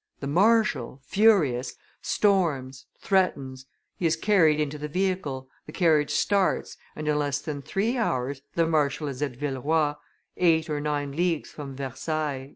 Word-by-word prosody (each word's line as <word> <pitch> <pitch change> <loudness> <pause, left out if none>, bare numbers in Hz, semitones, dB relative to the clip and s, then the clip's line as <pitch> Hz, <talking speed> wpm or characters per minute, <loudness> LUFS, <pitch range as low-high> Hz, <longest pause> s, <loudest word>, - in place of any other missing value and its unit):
The - - -5
marshal, 190 - +2
furious, 165 - +3 0.3
storms, 150 -11 0
threatens; 135 -9 0 0.3
he 170 - +1
is 160 - +2
carried 165 -5 +3
into 150 0 -2
the 150 - -4
vehicle, 155 -6 -2 0.2
the - - -8
carriage 155 -4 +2
starts, 195 +6 +1 0.2
and 155 0 -5
in 150 0 +2
less 145 -1 -1
than 145 -1 -5
three 200 - -1
hours 135 - -1
the 165 - +3
marshal 150 -1 0
is 135 -1 -6
at 140 -4 -2
Villeroi, 145 +2 0 0.4
eight 160 -2 +2
or 145 -1 -1
nine 145 -1 -2
leagues 165 +1 -1
from 140 -3 -8
Versailles." 140 +1 -3
150 Hz, 150 wpm, -26 LUFS, 140-175 Hz, 0.4 s, furious